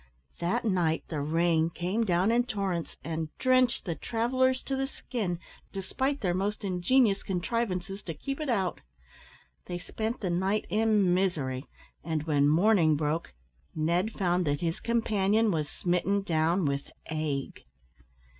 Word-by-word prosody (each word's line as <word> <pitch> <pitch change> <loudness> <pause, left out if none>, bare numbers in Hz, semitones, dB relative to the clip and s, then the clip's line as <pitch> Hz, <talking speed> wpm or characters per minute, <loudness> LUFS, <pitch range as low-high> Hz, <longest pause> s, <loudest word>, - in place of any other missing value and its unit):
That 175 +6 0
night 175 -6 +1
the 150 -3 -2
rain 165 +2 +2
came 180 +7 -1
down 185 +2 +2
in 240 +1 +3
torrents, 195 -7 -3
and 160 0 -3
drenched 255 -1 +3
the 170 - -1
travellers 255 +6 +1
to 270 - -2
the 270 0 -1
skin, 220 -9 -3 0.3
despite 265 +9 -2
their 180 -4 +1
most 200 +4 -2
ingenious 195 +3 +3
contrivances 195 0 -2
to 165 - -4
keep 275 - -4
it 305 -3 -3
out. 195 -7 0 0.9
They 175 - -3
spent 220 +6 -4
the 185 -4 -1
night 190 +4 +1
in 210 -4 +3
misery, 150 -8 0 0.4
and 160 -2 -1
when 145 -2 +3
morning 170 -1 +4
broke 150 - -2 0.4
Ned 170 +7 +1
found 180 -3 +1
that 145 0 0
his 170 +3 -1
companion 220 -2 +2
was 155 -4 -1
smitten 190 +3 0
down 165 0 +1
with 140 0 -1 0.2
ague. 150 -3 -2
185 Hz, 145 wpm, -29 LUFS, 165-220 Hz, 0.9 s, morning